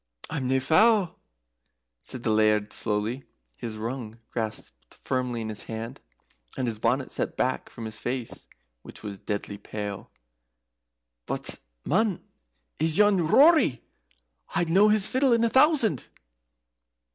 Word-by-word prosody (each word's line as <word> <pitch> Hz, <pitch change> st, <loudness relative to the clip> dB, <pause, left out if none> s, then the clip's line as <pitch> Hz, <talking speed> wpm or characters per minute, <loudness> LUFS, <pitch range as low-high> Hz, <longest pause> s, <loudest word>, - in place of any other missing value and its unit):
"I'm 140 Hz, -5 st, -2 dB
nae 130 Hz, +1 st, +2 dB
fou," 185 Hz, -, +4 dB, 0.9 s
said 125 Hz, -, -8 dB
the 110 Hz, -, +1 dB
Laird, 105 Hz, -1 st, +2 dB
slowly, 110 Hz, +5 st, -2 dB, 0.3 s
his 110 Hz, -, -6 dB
rung 115 Hz, 0 st, -5 dB
grasped 110 Hz, -2 st, -5 dB
firmly 125 Hz, -2 st, -2 dB
in 110 Hz, -, -4 dB
his 105 Hz, -1 st, -2 dB
hand, 115 Hz, +1 st, -6 dB, 0.6 s
and 130 Hz, -, 0 dB
his 110 Hz, -3 st, -2 dB
bonnet 130 Hz, +4 st, 0 dB
set -, -, -2 dB
back 130 Hz, +1 st, 0 dB
from 115 Hz, -, -8 dB
his 110 Hz, 0 st, -6 dB
face, 120 Hz, -1 st, -4 dB, 0.3 s
which -, -, -11 dB
was 100 Hz, -2 st, -6 dB
deadly 100 Hz, -1 st, -4 dB
pale. 105 Hz, -1 st, -6 dB, 1.2 s
"But -, -, -3 dB, 0.3 s
man 205 Hz, +2 st, +2 dB, 0.6 s
is 160 Hz, +1 st, +1 dB
yon 200 Hz, -5 st, +4 dB
Rory? 280 Hz, -, +5 dB, 0.7 s
I'd 170 Hz, -1 st, +1 dB
know 200 Hz, +4 st, +6 dB
his 210 Hz, -1 st, +4 dB
fiddle 260 Hz, -1 st, +3 dB
in 230 Hz, 0 st, +3 dB
a 230 Hz, -, +3 dB
thousand." 265 Hz, -, +3 dB
130 Hz, 135 wpm, -27 LUFS, -, 1.2 s, know